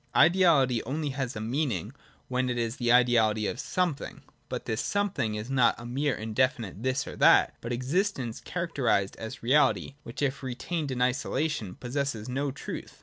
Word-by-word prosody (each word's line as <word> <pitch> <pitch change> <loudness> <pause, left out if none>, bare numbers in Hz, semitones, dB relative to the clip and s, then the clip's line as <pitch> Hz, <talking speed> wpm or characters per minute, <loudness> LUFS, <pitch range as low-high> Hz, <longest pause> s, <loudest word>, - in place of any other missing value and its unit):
Ideality 155 -8 +5
only 145 +4 -2
has 130 -3 -3
a - - -4
meaning 115 - -2 0.3
when 130 0 0
it 125 - -1
is 115 +2 -2
the 120 -3 +1
ideality 115 -3 +4
of 120 - -3
something: 175 -6 -2 0.3
but - - -4
this 110 - -1
something 180 - -1
is 105 +5 -5
not 130 -3 +4
a 120 - -9
mere 135 +3 0
indefinite 110 -2 -1
this 130 +2 0
or - - -7
that, - - +6
but 120 - -5
existence 130 - -1
characterised 140 - 0
as 110 0 -7
reality, 140 +2 +3
which, 115 +5 -6
if 140 -1 -1
retained 140 +4 -3
in 125 -1 0
isolation, 130 - -1
possesses 125 -3 -3
no 135 +3 -1
truth. 135 - -7
130 Hz, 165 wpm, -28 LUFS, 115-145 Hz, 0.3 s, that